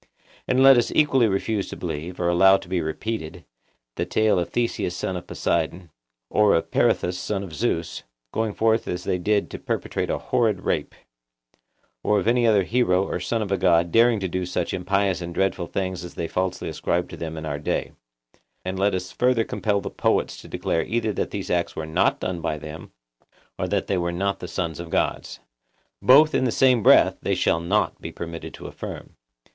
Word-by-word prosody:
And 130 +1 +3
let 135 -1 +8
us 120 - -1
equally 135 -6 +4
refuse 100 +1 -1
to - - -6
believe, 85 +5 -5
or 90 - 0
allow 95 +3 +6
to - - -12
be 90 -1 -1
repeated, 85 0 -4 0.5
the - - 0
tale 110 -4 +2
of 85 - -2
Theseus 115 -7 -1
son 95 - -3
of 90 - -6
Poseidon, 85 -2 -2 0.4
or 105 +6 +3
of 80 - -1
Peirithous 90 +1 +1
son 100 -2 -3
of 90 -5 -9
Zeus, 85 -4 -2 0.3
going 110 -2 -1
forth 110 0 +2
as 90 0 -3
they 90 - -1
did 105 +3 0
to - - -6
perpetrate - - -3
a - - 0
horrid 110 -6 0
rape; - - -2 1.1
or 105 - +2
of 95 - -3
any 120 0 +3
other 105 -3 +4
hero 95 -4 +2
or - - -3
son 110 +6 -1
of 100 - -6
a 100 - +2
god 85 -2 +3
daring 115 -1 +4
to 95 - -2
do 90 +1 -2
such 90 -1 -2
impious 95 0 0
and 85 0 -6
dreadful 95 -2 0
things 95 -2 -3
as 90 - -9
they 85 - -3
falsely 90 +2 -2
ascribe 85 +1 -1
to - - -8
them 80 -1 -6
in 80 - -5
our 75 -2 -3
day: 75 - -2 0.7
and 95 0 -3
let 100 0 +2
us 90 0 -4
further 125 -2 +2
compel 105 -2 -1
the - - -6
poets - - 0
to - - -13
declare 80 - -1
either 110 +1 -1
that - - -2
these 100 -2 -5
acts 85 -1 0
were 80 - -4
not 80 0 +1
done 90 -2 -3
by 80 -2 -2
them, 75 +2 -9 0.7
or - - -1
that - - 0
they 95 - 0
were 85 0 -1
not 100 +2 -1
the 90 - -6
sons 85 -2 -3
of 85 -1 -7
gods;—both 130 - +1
in 130 - +2
the 125 - +1
same 125 -2 +4
breath - - +5
they - - 0
shall 80 - +2
not 95 +6 0
be - - -6
permitted 85 -1 -7
to - - -12
affirm. - - -8
95 Hz, 205 wpm, -24 LUFS, 85-110 Hz, 1.1 s, let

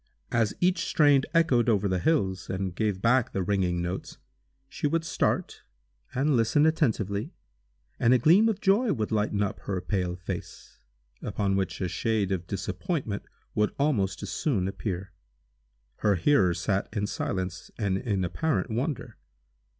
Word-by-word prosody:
As 115 -3 +1
each 180 +1 +2
strain 145 -4 +4
echoed 145 -8 +3
over 105 -3 +2
the 95 -1 0
hills, 95 - 0
and 95 -1 -2
gave 100 -1 -1
back 125 +1 +3
the 95 - 0
ringing 90 -2 0
notes, 90 +2 -5 0.5
she - - -2
would 165 +2 0
start, - - -1 0.5
and 140 +2 +2
listen 115 +6 +3
attentively, 110 - 0 0.6
and 115 - +4
a 130 - +7
gleam 175 - +5
of 210 -3 -1
joy 205 +4 +3
would 110 -5 -2
lighten 105 -1 +1
up 100 - -3
her 95 -2 -3
pale 90 -1 -2
face, 90 -1 -7 0.4
upon 100 -1 -1
which 95 -2 -1
a 90 - 0
shade 100 +3 0
of 90 -2 -2
disappointment 100 - -3 0.3
would 105 0 +1
almost 100 - 0
as - - -5
soon 105 - 0
appear. 95 -1 -4 0.9
Her 105 -2 +2
hearers 90 - +3
sat 95 +2 0
in 105 -1 -1
silence, 95 -2 -3
and 100 -4 0
in 100 -6 -1
apparent 155 - -1
wonder. 130 +5 -3
105 Hz, 150 wpm, -27 LUFS, 95-140 Hz, 0.9 s, a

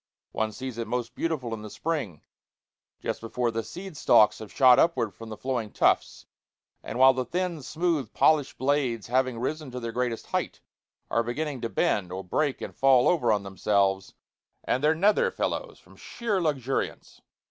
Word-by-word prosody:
One 110 0 -1
sees 130 +1 -6
it 115 - -3
most 120 0 -3
beautiful 135 -8 -2
in 110 - -5
the 105 - -8
spring, 135 - -4 0.8
just - - -3
before 120 +1 -1
the 115 0 -2
seed 180 - -9
stalks 105 -6 +4
have 110 - -9
shot 130 -2 +6
upward 140 -11 +2
from 115 -1 -10
the 110 - -7
flowing 120 -5 -3
tufts, - - +1 0.6
and - - -6
while 130 +1 +7
the 130 0 -1
thin, 175 +4 -3
smooth, 155 -2 -1
polished 150 -3 +2
blades, 130 -5 0
having 130 0 0
risen 150 +4 -3
to 125 0 -6
their 115 -1 -4
greatest 120 -1 -2
height, - - -3 0.5
are 115 - +3
beginning 135 +3 -3
to 115 - -2
bend, 95 -5 0
or 95 +1 -5
break 140 - -1
and - - -7
fall 135 -2 +5
over 125 -10 +3
on 105 -2 +1
themselves 95 0 0 0.5
and 130 - -1
their 155 +1 +4
nether 200 +6 +3
fellows - - -3
from - - -20
sheer 215 -6 -3
luxuriance. 135 -5 -2
125 Hz, 175 wpm, -27 LUFS, 115-150 Hz, 0.8 s, while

